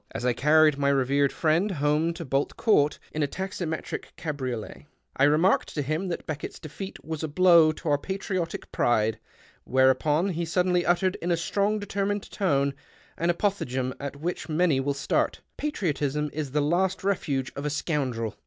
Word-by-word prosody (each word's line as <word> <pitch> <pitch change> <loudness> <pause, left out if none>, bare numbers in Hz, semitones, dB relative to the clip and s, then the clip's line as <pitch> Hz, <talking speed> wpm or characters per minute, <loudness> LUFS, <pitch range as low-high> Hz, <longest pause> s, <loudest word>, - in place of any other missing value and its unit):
As 120 - -5
I 125 - +3
carried 150 +2 +4
my 140 0 +2
revered 140 +1 +2
friend 165 +5 +1
home 150 -1 +1
to 170 -1 -6
Bolt 135 +1 -1
Court 150 -10 +3
in 155 - -3
a 145 - +2
taximetric 175 -1 -4
cabriolet, 130 -8 -5 0.3
I 135 - +4
remarked 155 +6 +3
to 145 - 0
him 155 +7 -2
that 175 - -4
Beckett's 150 -2 -5
defeat 190 +4 -8
was 160 -1 -4
a 160 - -2
blow 170 0 +6
to 160 - -9
our 145 -1 +3
patriotic 185 -1 -4
pride, 110 -2 +1 0.4
whereupon 130 +7 +3
he 170 -2 -2
suddenly 180 +1 +1
uttered, 185 +1 +2
in 175 - -2
a 170 - +2
strong, 200 +5 0
determined 205 0 -2
tone, 140 -8 +1 0.4
an 170 - -1
apophthegm 130 -9 -1
at 140 0 -5
which 165 +4 -4
many 155 -3 +2
will 140 +1 -1
start: 140 - 0
— - - -47
" - - -51
Patriotism 150 - -1
is 150 -2 -3
the 150 +3 0
last 180 +6 +1
refuge 140 -9 -1
of 140 - -5
a 150 - -1
scoundrel 135 - -2
155 Hz, 175 wpm, -26 LUFS, 140-180 Hz, 0.4 s, blow